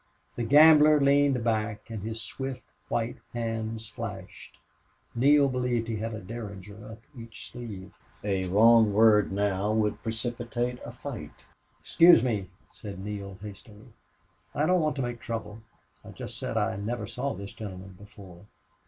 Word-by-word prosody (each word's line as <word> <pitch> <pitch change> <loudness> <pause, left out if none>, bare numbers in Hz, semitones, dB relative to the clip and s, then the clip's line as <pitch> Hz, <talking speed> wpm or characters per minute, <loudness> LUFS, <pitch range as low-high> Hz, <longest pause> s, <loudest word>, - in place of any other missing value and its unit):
The - - -4
gambler 150 +4 +7
leaned 140 -3 +3
back 110 -2 -1
and 110 -3 -5
his 110 +2 -5
swift 130 -1 -6 0.3
white 115 +1 -1 0.2
hands 115 -1 -3
flashed. 110 -5 -8 0.6
Neale 140 +4 +5
believed 125 -3 -1
he 115 -1 -2
had 110 +1 -4
a - - -6
derringer 105 0 -9
up 115 - -15
each 115 -2 -10
sleeve. 105 -7 -8 0.3
A 95 -2 -1
wrong 110 +2 +5
word 105 -1 +5
now 100 +1 0
would 110 -1 0
precipitate 120 +2 -3
a - - -7
fight. - - -9 0.4
"Excuse 170 -8 +6
me," 105 -7 -1 0.2
said 100 -3 -9
Neale, 100 -1 -6
hastily. 105 +1 -12 0.7
"I 150 - +2
don't 180 +1 +3
want 155 -1 0
to 135 - -2
make 120 -1 -4
trouble. 110 -2 -6 0.4
I - - -12
just - - -8
said - - -3
I - - 0
never 115 +4 -3
saw 135 +2 -3
this 100 +1 -8
gentleman 95 -3 -9
before." 100 -2 -14
115 Hz, 150 wpm, -28 LUFS, 105-120 Hz, 0.7 s, gambler